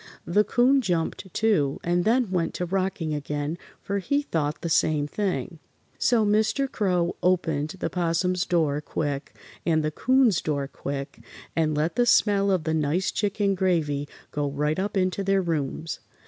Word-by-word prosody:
The 205 +5 +3
'Coon 255 +5 +3
jumped, 180 -1 -2
too, 165 -12 +1
and 175 +1 +1
then 230 -2 +2
went 175 -3 -1
to 180 - -2
rocking 185 -3 -1
again, 150 +3 -3 0.2
for 200 0 -1
he 285 +9 0
thought 155 - -2
the - - -3
same 150 -2 +2
thing. 180 -1 -3 0.4
So 230 -3 +3
Mr. 220 +6 +2
Crow 180 -8 0
opened 165 -4 0
the - - -2
'Possum's 180 +1 0
door 155 -5 +1
quick 145 -2 -3 0.3
and 160 -2 +2
the 155 - 0
'Coon's 255 - +3
door 145 -3 -1
quick 140 0 -6 0.4
and 155 -2 +1
let 160 +8 -1
the 245 0 +3
smell 200 -3 +4
of 185 -4 +1
the 160 +1 -1
nice 160 +4 +1
chicken 205 -1 0
gravy 160 -6 0 0.2
go 145 -1 -1
right 150 +4 -1
up 200 +1 -2
into 185 +1 0
their 195 0 +2
rooms. 160 -1 -2
175 Hz, 160 wpm, -25 LUFS, 155-200 Hz, 0.4 s, smell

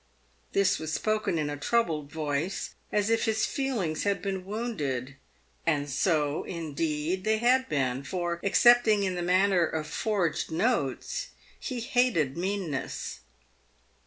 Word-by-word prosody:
This 200 -1 +3
was 155 0 -4
spoken 215 0 0
in 150 -2 0
a 145 - -3
troubled 155 -5 0
voice, 155 +3 -2 0.2
as 210 +1 +1
if 230 0 +2
his 220 -1 +1
feelings 230 - -1
had 200 -1 +1
been 190 -2 -3
wounded 145 - -3 0.3
— - - -35
and 145 -3 +2
so, 150 0 +1
indeed, 165 +1 -2
they 220 0 +2
had 255 +3 +3
been, 130 -3 0
for, 170 +4 -3
excepting 220 0 +5
in 190 -1 0
the 180 - -3
matter 185 +1 +3
of 155 -1 -3
forged 180 +1 -1
notes, 160 - -1 0.3
he 250 -2 -4
hated 240 - +2
meanness. 180 -6 -3
180 Hz, 135 wpm, -28 LUFS, 150-215 Hz, 0.3 s, excepting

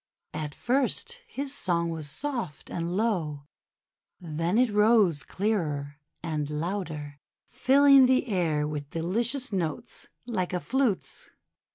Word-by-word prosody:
At 150 -1 -4
first 280 - -1
his 280 -10 -4
song 170 -8 0
w^as 160 -2 -5
soft 185 - -4
and 170 +2 -2
low, 170 -10 -1 0.8
then 165 +3 -1
it 250 -2 +4
rose 210 -7 +4
clearer 150 -9 -2 0.3
and 155 -3 -2
louder, 150 -3 -4 0.3
filling 275 0 +6
the 260 0 +3
air 165 -9 0
with 145 -2 -5
delicious 225 - -1
notes 170 -5 -3 0.2
like 185 -7 -2
a 180 - 0
flute's. 255 -1 -1
180 Hz, 115 wpm, -27 LUFS, 155-240 Hz, 0.8 s, filling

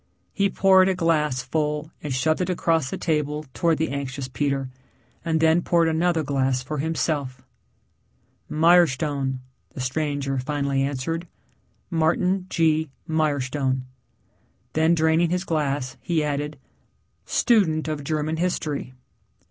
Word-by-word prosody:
He 200 -1 +2
poured 190 0 +5
a 190 - +1
glass 150 -7 +1
full 150 0 -2
and 150 - -5
shoved 155 +7 +1
it 180 - -1
across 165 -5 +1
the - - -4
table 150 -2 -1
towards 165 -2 +1
the 160 - -1
anxious 140 -1 -4
Peter, 135 -1 -2 0.5
and 165 -1 0
then 160 +2 +4
poured 170 -1 +2
another 160 0 +1
glass 135 -2 0
for 150 +2 -4
himself. 145 -4 -2 1.1
"Mirestone," 150 -5 +3 0.3
the - - -7
stranger 140 0 -1
finally 140 0 -1
answered, 145 +5 -2 0.6
"Martin 180 +3 +1
G. 160 -3 +2 0.2
Mirestone." 140 -4 0 0.9
Then, 160 +2 +3
draining 160 +1 +3
his 180 +1 0
glass, 140 -6 -2
he 165 -3 0
added, 150 0 -2 0.7
"Student 175 -11 +2
of 155 -2 -3
German 155 +2 -1
history." 155 -6 -2
155 Hz, 125 wpm, -24 LUFS, 140-165 Hz, 1.1 s, poured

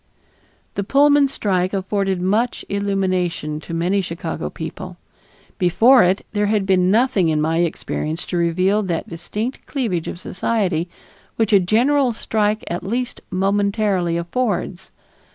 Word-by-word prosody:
The 200 - -2
Pullman 285 +5 +4
strike 190 -8 -1
afforded 195 -1 -1
much 210 +7 0
illumination 185 -6 -1
to 160 - -10
many 175 +4 +1
Chicago 170 -2 -4
people. - - -7 0.6
Before 225 +8 +5
it, 185 +2 +1
there 210 -1 0
had 210 -2 +1
been 185 -1 +3
nothing 210 -5 +3
in 155 -1 +1
my 160 +2 +1
experience 165 -1 -2
to - - -4
reveal 185 +5 +2
that 175 -5 -3
distinct 210 +9 -5
cleavage 220 - -2
of - - -5
society, 185 -4 -1 0.5
which 225 -2 +1
a 200 - +7
general 245 +7 +2
strike 215 -1 -1
at 175 - -3
least 245 +5 -3
momentarily 195 -2 +1
affords. 190 0 -2
195 Hz, 135 wpm, -20 LUFS, 175-215 Hz, 0.6 s, a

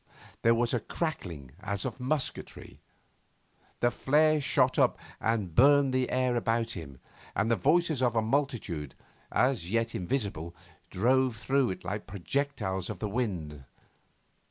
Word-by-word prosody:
There 115 0 +5
was 120 +1 0
a 120 - +2
crackling 85 - -4
as 100 -2 -3
of - - -4
musketry. 130 +2 -3 1.0
The 120 - +3
flare 150 +4 +3
shot 130 -2 +2
up - - +3 0.2
and 105 -6 -1
burned 140 - +5
the 130 -1 +1
air 130 -1 +1
about 115 0 0
him, 70 - -8 0.4
and 110 +3 +1
the - - +5
voices 155 - +2
of 120 -2 +2
a 115 - +3
multitude, 110 - -1 0.4
as 125 -10 +1
yet 115 +2 0
invisible, 90 - -3 0.3
drove 125 +5 +2
through 135 +3 +1
it 95 - -5
like 105 +4 -4
projectiles 100 -2 -2
on 105 - -4
the 105 - -3
wind. 90 - -3
115 Hz, 140 wpm, -29 LUFS, 95-130 Hz, 1.0 s, There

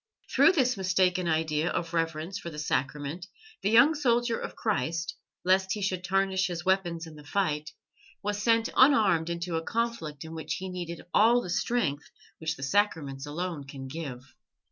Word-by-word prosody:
Through 395 - +6
this 255 - +2
mistaken 185 -1 +2
idea 160 0 +1
of 170 0 -3
reverence 165 +3 -1
for 170 - -6
the 150 - -9
Sacrament 150 +4 -2 0.3
the 200 - +1
young 235 +8 +6
soldier 240 -5 +1
of - - -6
Christ, 165 - -1 0.3
lest 190 +1 +3
he 210 - -4
should 185 -2 -1
tarnish 190 0 +1
his 175 -1 -5
weapons 175 -3 +1
in 160 - -11
the 150 -1 -12
fight, 150 -2 -1 0.5
was 205 0 -2
sent 230 +1 +3
unarmed 205 - +5
into 170 0 -2
a - - -1
conflict 225 -11 -3
in 160 - -8
which 160 -1 -3
he 190 0 -5
needed 175 -2 -6
all 230 +3 +6
the 180 -7 -5
strength 170 -11 -1 0.3
which 160 0 -2
the 135 - -8
Sacraments 140 -5 0
alone 165 0 -4
can 135 -1 -8
give. 135 -4 -7
175 Hz, 170 wpm, -28 LUFS, 155-200 Hz, 0.5 s, Through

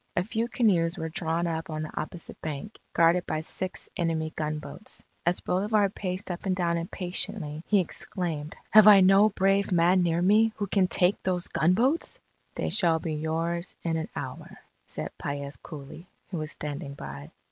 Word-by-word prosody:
A 175 - +2
few 225 +3 -2
canoes 185 -8 +2
were 160 -2 -3
drawn 165 +1 -1
up 165 -1 -3
on 155 0 -3
the 155 - -6
opposite 165 +2 -8
bank, 155 +7 -6
guarded 170 +1 +3
by 155 - -1
six 185 +3 -3
enemy 160 -2 -1
gunboats. 155 +6 -5 0.2
As 175 - +1
Bolivar 205 +2 +1
paced 185 0 -4
up 175 +3 -5
and 185 - +1
down 170 -2 0
impatiently, 175 -2 -3
he 205 - +4
exclaimed: 165 -4 -2 0.2
"Have 215 -1 +8
I 200 -2 +9
no 195 +3 +6
brave 195 0 +1
man 180 +1 +4
near 170 0 +1
me, 215 +4 +4
who 205 - -2
can 195 -1 +2
take 180 +1 +4
those 180 -1 -1
gunboats?" 235 - +1 0.4
"They - - -2
shall 170 -4 +4
be 160 0 -4
yours 165 +3 -1
in 165 -1 0
an 160 0 -3
hour," - - -7 0.3
said - - -6
Paez 140 0 -4
coolly, 150 +3 -10 0.2
who 175 - -3
was 155 0 -4
standing 145 -1 -6
by. 70 - -8
175 Hz, 170 wpm, -27 LUFS, 160-195 Hz, 0.4 s, I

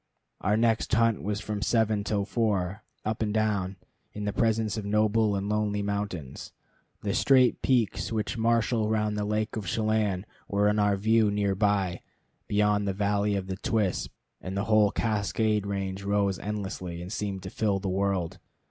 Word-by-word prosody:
Our 105 +2 +1
next 115 -1 +1
hunt 115 -1 +2
was 105 +1 -2
from 105 -2 -4
seven 110 -2 +2
till 100 -1 -1
four, 105 -4 -1 0.2
up 110 +1 -2
and 105 -1 0
down, 105 -3 0 0.4
in 105 0 -5
the 105 - -1
presence 110 -2 +1
of 110 - -4
noble 105 +1 +2
and 100 +1 -2
lonely 105 -1 0
mountains. 100 -9 -4 0.5
The 100 -1 -1
straight 130 -2 +4
peaks 120 -5 +1
which 110 0 -2
marshal 115 -1 +1
round 105 -1 0
the 105 0 -1
lake 105 +1 -1
of 105 -4 -4
Chelan 110 -3 0 0.2
were 100 +1 +2
in 105 +1 +1
our 105 -1 +3
view 110 +1 +3
near 100 -1 +1
by, 95 -3 +1 0.5
beyond 105 0 +2
the 100 - 0
valley 100 +1 +1
of 95 -1 -2
the 95 0 -5
Twispt, 105 -2 0 0.3
and 95 +1 -5
the 100 - 0
whole 110 -1 +4
Cascade 105 -1 0
range 100 -1 -3
rose 100 -1 0
endlessly, 95 -4 -4
and 90 +4 -6
seemed 100 -3 -3
to 95 - -7
fill 105 -3 +1
the 95 0 -4
world. 95 -2 -1
105 Hz, 175 wpm, -28 LUFS, 100-110 Hz, 0.5 s, straight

